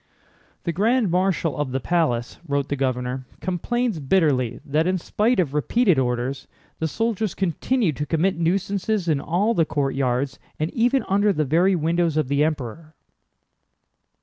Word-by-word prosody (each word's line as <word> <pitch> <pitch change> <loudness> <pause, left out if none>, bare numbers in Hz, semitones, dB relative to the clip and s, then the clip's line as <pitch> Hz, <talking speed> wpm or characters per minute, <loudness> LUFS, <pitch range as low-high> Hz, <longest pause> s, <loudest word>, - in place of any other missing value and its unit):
"The 170 - -1
Grand 220 +2 +2
Marshal 180 -3 +1
of 145 -3 -2
the 135 - -1
palace," 130 -6 0
wrote 140 -1 -1
the 145 - 0
governor, 130 -1 -2
"complains 215 +3 -1
bitterly 135 -6 +1
that 155 +4 +1
in 185 0 +1
spite 215 +7 0
of 150 -7 +1
repeated 180 - +2
orders, 125 +2 -2 0.3
the 160 - 0
soldiers 220 +2 -1
continue 195 - 0
to 150 +1 -4
commit 170 +2 +1
nuisances 195 +3 0
in 150 -4 +1
all 200 +7 +1
the 170 - +3
courtyards 135 -3 -1 0.2
and 155 +2 -1
even 245 +3 +2
under 205 +2 +3
the 155 -5 0
very 175 +7 +3
windows 165 0 +1
of 150 -4 0
the 140 +1 +2
Emperor." 155 +1 -4
160 Hz, 150 wpm, -23 LUFS, 140-195 Hz, 0.3 s, the